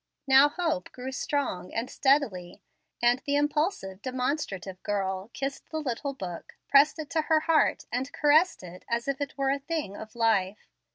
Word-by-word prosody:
Hope 275 +3 +6
now 335 - +1
grew 255 +1 -6
strong 270 -8 -2
and 230 +2 -1
steadily, 265 -13 0 0.4
and 240 +1 +4
the 285 -2 0
impulsive, 290 - 0
demonstrative 250 - -3
girl 190 0 -2
kissed 275 +2 -5
the 315 - -4
little 275 0 -3
Book, 180 -8 -7
pressed 285 +3 +5
it 305 -2 -7
to 320 - +2
her 310 0 +2
heart, 320 0 +2
and 255 +4 -2
caressed 305 - +3
it 180 0 -10
as 235 +1 -1
if 275 +1 -2
it 285 -1 -4
were 270 -1 +1
a 280 - 0
thing 285 - -4
of 220 +2 -10
life. 215 -4 0
265 Hz, 170 wpm, -28 LUFS, 205-290 Hz, 0.4 s, Hope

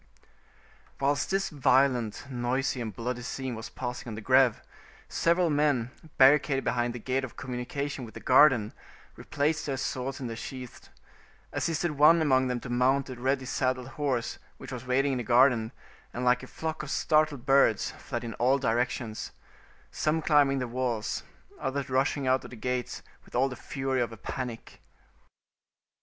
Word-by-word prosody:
Whilst 140 +1 +1
this 195 0 0
violent, 130 -5 +2
noisy, 130 +1 -1
and 110 -2 -4
bloody 120 +4 -4
scene 130 +1 -4
was 110 0 -7
passing 125 -1 -6
on 110 - -5
the 110 - -7
Greve, - - +4 0.5
several 170 0 +2
men, 145 -5 +1 0.3
barricaded 135 0 +5
behind 120 0 0
the - - -5
gate 130 +3 -1
of 130 - -7
communication 130 +2 -4
with 110 - -10
the - - -6
garden, 125 -5 +5 0.4
replaced 155 +2 -1
their 135 -2 -1
swords 130 +1 -3
in 130 - -5
their 115 -1 -4
sheaths, 125 +1 -9 0.6
assisted 165 0 -1
one 165 +3 +7
among 130 -4 +3
them 125 -1 -1
to - - -8
mount 130 +2 +2
a - - -6
ready 130 +2 -1
saddled 130 -1 -1
horse 130 -3 -2 0.2
which - - -10
was 125 0 -7
waiting 135 +2 +2
in 130 - -1
the - - -3
garden, 120 -1 +4 0.4
and 125 +1 -2
like 125 0 +3
a 130 - -9
flock 160 +2 -4
of 150 - -7
startled 155 -5 +1
birds, 135 -6 +3
fled - - -5
in 115 -1 -5
all 130 +3 +4
directions, 120 -3 -2 0.6
some 155 +1 0
climbing 145 -3 +4
the 125 -2 -2
walls, 120 -3 -2 0.4
others 135 0 -3
rushing 135 +2 +1
out 130 0 +2
at - - -9
the - - -10
gates 125 +2 -3 0.2
with - - -14
all 135 +2 +3
the 125 - -6
fury 135 -1 -2
of 120 - -1
a 115 - -9
panic. 120 +1 -6
130 Hz, 170 wpm, -28 LUFS, 120-140 Hz, 0.6 s, one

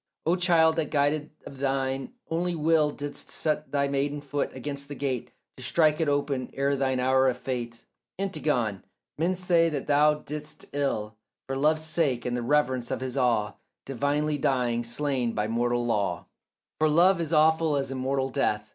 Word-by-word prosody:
O 165 +3 +3
child, 170 -3 +4
that 155 -3 0
guided 150 +1 +1 0.2
of 135 - -10
thine 135 - -1 0.2
only 175 +1 0
will 155 -1 +3
Didst 145 0 -6
set 155 -1 -2
thy 140 -1 +1
maiden 140 +1 -1
foot 145 0 -2
against 140 +2 -6
the 145 - -7
gate 130 -3 -2 0.3
To - - -10
strike 155 -2 +3
it 160 -3 +1
open 140 -3 -1
ere 140 +1 +1
thine 130 -1 0
hour 130 +1 +3
of 125 -1 +1
fate, 120 -2 -5 0.3
Antigone, 145 - -1 0.4
men 175 +3 +1
say 175 -2 +3
not 145 -3 -3
thou 150 +1 +4
didst 150 0 -7
ill, 110 -7 -2 0.3
For 135 - -3
love's 155 +3 +2
sake 155 -7 0
and 125 0 -1
the 120 - -2
reverence 130 -2 +1
of - - -2
his 130 -1 -3
awe 115 -6 +1 0.3
Divinely 145 +3 0
dying, 125 -3 +1
slain 125 0 -1
by 105 0 -1
mortal 120 +1 0
law; 100 -6 -1 0.5
For 155 0 +3
love 170 +3 +4
is 160 -1 -3
awful 160 0 +4
as 135 -1 -1
immortal 135 0 -1
death. 105 -6 -1
140 Hz, 175 wpm, -27 LUFS, 125-155 Hz, 0.5 s, child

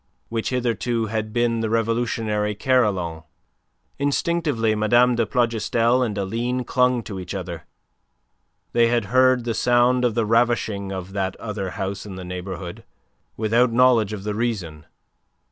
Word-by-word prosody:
which 115 -1 -2
hitherto 120 -2 -1
had 110 0 -3
been 120 0 +1
the 110 -1 -1
revolutionary 115 -2 0
carillon. 100 -10 +1 0.8
Instinctively 145 -5 0
Mme. 120 +4 +3
de 115 -1 0
Plougastel 120 0 +1
and 110 -5 -1
Aline 120 +6 -2
clung 125 -1 +1
to 100 -3 -6
each 90 +2 -6
other. 85 -2 -6 1.1
They 120 -1 +4
had 120 -2 +1
heard 130 -1 +4
the 115 -1 -1
sound 125 +2 +3
of 120 -3 +1
the 115 - +1
ravishing 110 -3 +1
of 95 0 -6
that 95 -1 -2
other 105 -4 -5
house 95 -1 -3
in 95 - -7
the 95 -1 -7
neighbourhood, 90 0 -6 0.5
without 115 +3 +2
knowledge 120 -3 +4
of 105 -2 -6
the 105 0 -2
reason. 100 -10 -3
115 Hz, 145 wpm, -23 LUFS, 100-120 Hz, 1.1 s, They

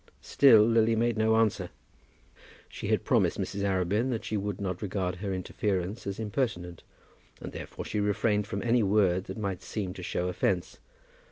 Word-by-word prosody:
Still 120 -7 +6
Lily 115 0 +3
made 120 +1 +1
no 110 0 +3
answer. 105 -5 +1 1.0
She - - -7
had - - +1
promised - - +2
Mrs. 100 - -3
Arabin 100 +5 +1
that 115 -4 -3
she 110 - -2
would 100 -1 -3
not 95 -3 -3
regard 95 -3 -2
her 100 +1 -4
interference 95 +2 -2
as 100 - -3
impertinent, 105 - -3 0.6
and - - -7
therefore - - -7
she 105 - -2
refrained 105 0 +1
from 100 - -4
any 120 0 +3
word 95 -3 +2
that - - -7
might 100 -4 -3
seem 95 -3 -4
to 95 - -9
show 90 0 -2
offence. 90 0 -1
100 Hz, 170 wpm, -29 LUFS, 95-110 Hz, 1.0 s, Still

